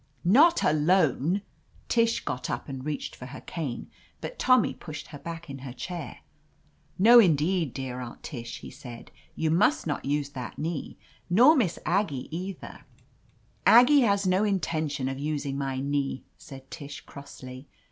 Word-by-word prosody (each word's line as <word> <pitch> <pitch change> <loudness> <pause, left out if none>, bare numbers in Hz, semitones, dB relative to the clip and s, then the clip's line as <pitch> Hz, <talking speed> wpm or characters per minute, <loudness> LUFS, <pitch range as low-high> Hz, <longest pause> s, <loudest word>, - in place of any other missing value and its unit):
"Not 300 - +5
alone 160 +3 +2 0.2
!" - - -31
Tish 230 -1 +1
got 125 -3 -3
up - - -4
and 135 -2 -6
reached 150 -1 -4
for 125 - -9
her - - -9
cane, 145 -8 -5 0.3
but - - -7
Tommy 255 -3 +4
pushed 150 -3 -9
her 145 - -9
back 170 +2 -7
in 135 -1 -7
her 130 -1 -8
chair. 170 +2 -7 0.8
"No, 235 +5 +8
indeed, 165 - +3
dear 130 0 -5
Aunt 120 -2 -8
Tish," 120 -6 -7
he - - -9
said. 125 -3 -11 0.2
"You 160 -1 0
must 210 - +3
not 150 -4 -2
use 145 +1 -1
that 130 -4 -7
knee. 160 -1 -4 0.3
Nor 245 - +7
Miss 210 - +1
Ag 200 +4 +2
gie 140 +1 -6
either 185 +2 -7 0.3
— - - -35
" - - -37
"Aggie 275 +4 +7
has 200 -4 +2
no 185 +2 +3
intention 155 -9 -1
of 135 0 -4
using 145 -2 -2
my 135 -1 -2
knee," 140 -1 -2
said 135 -1 -13
Tish 145 -2 -8
crossly. 135 -1 -11
150 Hz, 165 wpm, -27 LUFS, 135-190 Hz, 0.8 s, No